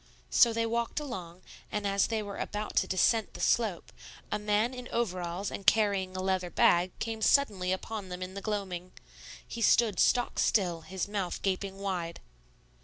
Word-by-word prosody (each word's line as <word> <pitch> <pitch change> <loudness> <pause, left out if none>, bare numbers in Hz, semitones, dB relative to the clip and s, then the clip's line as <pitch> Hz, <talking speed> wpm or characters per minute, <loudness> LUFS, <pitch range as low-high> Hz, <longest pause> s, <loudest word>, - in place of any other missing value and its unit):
So 235 - +6
they 230 0 0
walked 235 +4 -1
along; 185 - -7 0.3
and 210 -1 -2
as 200 0 +2
they 220 -2 -1
were 200 -1 -7
about 210 0 -4
to - - +3
descent 220 +4 +2
the - - -7
slope, 215 -7 0 0.4
a 210 - 0
man 210 +4 +1
in 250 -1 -7
overalls 185 -4 -2
and 200 - -6
carrying 200 -4 +3
a 185 - -2
leather 185 -2 0
bag 175 +1 +3
came 225 -1 -4
suddenly 205 -10 +3
upon 195 +1 -4
them 180 0 -5
in 185 +1 -7
the 200 - -6
gloaming. 190 -4 -4 0.5
He 235 - -6
stood 220 -4 +4
stock 245 -1 +2
still, 175 -6 +2
his 185 +3 -4
mouth 200 -4 -3
gaping 195 0 -1
wide. 180 -4 -3
200 Hz, 175 wpm, -30 LUFS, 185-220 Hz, 0.5 s, So